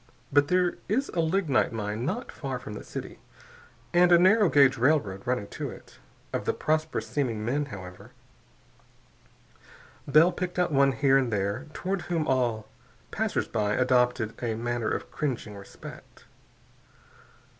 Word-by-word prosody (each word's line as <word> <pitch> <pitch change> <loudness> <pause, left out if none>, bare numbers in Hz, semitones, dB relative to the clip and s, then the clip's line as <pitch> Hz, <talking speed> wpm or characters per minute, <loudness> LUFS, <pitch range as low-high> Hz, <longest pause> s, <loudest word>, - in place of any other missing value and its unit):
But 145 0 +5
there 180 0 +1
is 260 +7 0
a 175 - -3
lignite 160 -5 +1
mine 110 +1 -3
not 225 +8 -3
far 135 -3 -4
from 115 -4 -8
the - - -7
city, - - -8 0.7
and 175 0 +5
a 175 - +8
narrow 195 +2 +5
gauge 140 -3 +5
railroad 120 -7 +1
running 125 -4 0
to - - -5
it. - - -13 0.3
Of - - -2
the - - 0
prosperous 155 0 -1
seeming 115 -7 -2
men, 145 +5 0
however, 95 -7 -10 2.0
Bell 155 +5 +6
picked 180 0 -4
out 180 -2 +1
one 140 -1 +4
here 135 0 +4
and 130 -3 -1
there 100 +7 -2
toward 190 +3 -2
whom 165 -3 -2
all 120 -5 0 0.4
passersby 115 - -1 0.2
adopted 125 -3 +2
a 115 -2 -1
manner 120 0 -2
of - - -4
cringing 125 -8 -3
respect. 100 0 -12
135 Hz, 145 wpm, -27 LUFS, 115-165 Hz, 2.0 s, a